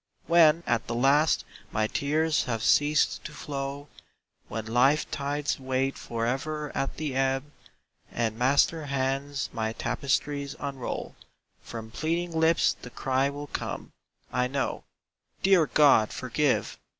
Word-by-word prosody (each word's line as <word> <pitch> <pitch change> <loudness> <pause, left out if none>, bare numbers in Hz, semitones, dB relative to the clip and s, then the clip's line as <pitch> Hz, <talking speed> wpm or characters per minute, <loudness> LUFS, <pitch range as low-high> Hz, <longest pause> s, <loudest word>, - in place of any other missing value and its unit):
When 170 -1 +5
at 120 -1 0
the 115 - -2
last 140 +6 +3 0.3
my 110 - +1
tears 155 +6 +1
have 115 -3 -2
ceased 150 0 +3
to - - -7
flow, 140 0 -5 0.6
When 110 -1 -5
life 125 +6 +3
tides 145 0 -2
wait 130 +1 -1
forever 135 +6 -3
at 135 - -2
the 150 -3 -3
ebb, 135 +2 0 0.6
And 115 -2 -1
Master 140 +5 +2
hands 135 +1 -2
my 110 0 -2
tapestries 140 +3 -1
unroll, 135 -3 -5 0.5
From 110 -1 -8
pleading 170 +6 -1
lips 160 0 +3
the 125 - -8
cry 130 +2 0
will 145 +1 -6
come, - - -5 0.4
I 125 0 +2
know: 135 +1 -2 0.6
"Dear 185 -5 +5
God, 140 -8 +5
forgive! 130 +3 0
140 Hz, 125 wpm, -27 LUFS, 125-150 Hz, 0.6 s, When